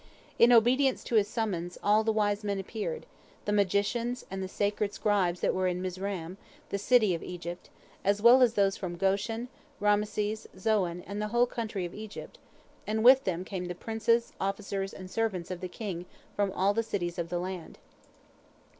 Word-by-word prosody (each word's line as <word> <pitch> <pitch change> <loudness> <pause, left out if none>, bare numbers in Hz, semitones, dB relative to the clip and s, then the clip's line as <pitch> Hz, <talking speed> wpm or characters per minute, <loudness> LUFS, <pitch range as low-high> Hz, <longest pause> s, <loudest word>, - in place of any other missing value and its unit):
In 235 +1 +7
obedience 250 +3 +4
to - - -7
his 210 -2 +4
summons, 185 -6 -3
all 210 +2 +4
the 220 - +2
wise 210 -1 +1
men 200 -1 -1
appeared, 220 - -4 0.4
the 205 - 0
magicians 210 +5 0
and 195 0 -4
the 190 - -3
sacred 205 +1 -1
scribes 190 -5 +1
that - - +2
were 185 0 +1
in 180 0 -1
Mizraim, 185 -1 -4 0.3
the 200 - -2
city 215 -2 +4
of 165 - -3
Egypt, 175 0 -7 0.3
as 200 +1 +2
well 240 +4 +7
as 240 -2 +4
those 195 -1 +3
from 175 -2 -5
Goshen, 200 +6 0 0.3
Raamses, 210 +1 0
Zoan, 185 -4 0
and 205 +1 -5
the 210 - -1
whole 240 +3 +3
country 220 -6 -4
of 175 - -7
Egypt, 215 0 -9 0.5
and 220 +1 0
with 260 +2 +7
them 185 -1 -2
came 185 -2 -4
the 175 0 -5
princes, 225 +3 0
officers, 195 0 -2
and 185 - -9
servants 190 -3 -2
of 180 0 -5
the 185 - -4
king 180 -3 -5 0.3
from 200 -1 +1
all 195 +2 +2
the 225 - +1
cities 185 -6 -3
of 170 0 -3
the 175 - -1
land. 180 -1 -5
205 Hz, 180 wpm, -29 LUFS, 185-220 Hz, 0.5 s, In